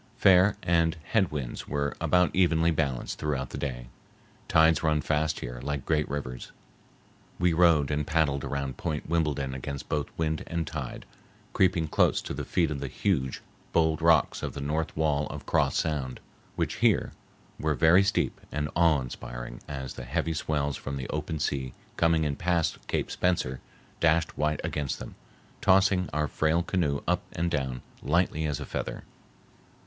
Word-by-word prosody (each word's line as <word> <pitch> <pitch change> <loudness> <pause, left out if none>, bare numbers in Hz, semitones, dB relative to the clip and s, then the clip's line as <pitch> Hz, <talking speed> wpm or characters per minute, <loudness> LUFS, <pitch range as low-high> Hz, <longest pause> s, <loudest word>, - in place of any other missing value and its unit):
Fair 95 +1 +5
and 85 -1 +2
head 100 -7 +3
winds 70 -5 -5
were 70 0 -1
about 90 -1 +3
evenly 85 -2 +3
balanced 70 -6 -2
throughout 70 -4 -2
the - - -5
day. 60 -4 -4 0.6
Tides 80 -1 +5
run 80 -1 +2
fast 75 +1 0
here, - - -6
like 70 -1 -3
great 75 -2 +1
rivers. 65 -3 -5 0.9
We 90 -1 +2
rowed 80 -4 +4
and 75 0 -1
paddled 75 -4 +1
around 70 -2 -3
Point 80 -4 -3
Wimbledon 75 -5 0
against 70 +1 -6
both 75 -3 0
wind 80 -1 -1
and 85 -1 -2
tide, 75 -5 -6 0.5
creeping 90 -4 +2
close - - +3
to - - -5
the - - -4
feet 85 -4 +1
of 70 - -3
the 70 - -3
huge, 65 -3 -1 0.3
bold 80 -1 +2
rocks 80 -2 +4
of - - -4
the - - -4
north 75 +3 -2
wall 75 -2 +1
of - - -7
Cross - - +2
Sound, 70 -6 -1 0.4
which - - -1
here - - +3 0.5
were 75 -1 +1
very 80 +8 +6
steep 100 0 0
and 75 0 -2
awe 80 -4 +4
inspiring - - -7
as 65 -3 -5
the - - -8
heavy 80 +6 -1
swells 75 -3 -1
from 70 0 -5
the 65 - -4
open 80 - -3
sea 65 -4 -2 0.2
coming 85 -1 +3
in 75 -2 -1
past 85 -2 0
Cape - - -1
Spencer 80 -8 0 0.4
dashed 80 0 +2
white 75 0 0
against 75 -3 -2
them, - - -8 0.5
tossing 95 -1 +4
our 75 +1 0
frail 80 +3 +1
canoe 80 -6 0
up - - +2
and 85 +1 -1
down 65 -4 -2 0.2
lightly 80 0 +1
as 75 -4 -2
a - - -5
feather. - - -4
75 Hz, 165 wpm, -28 LUFS, 70-85 Hz, 0.9 s, very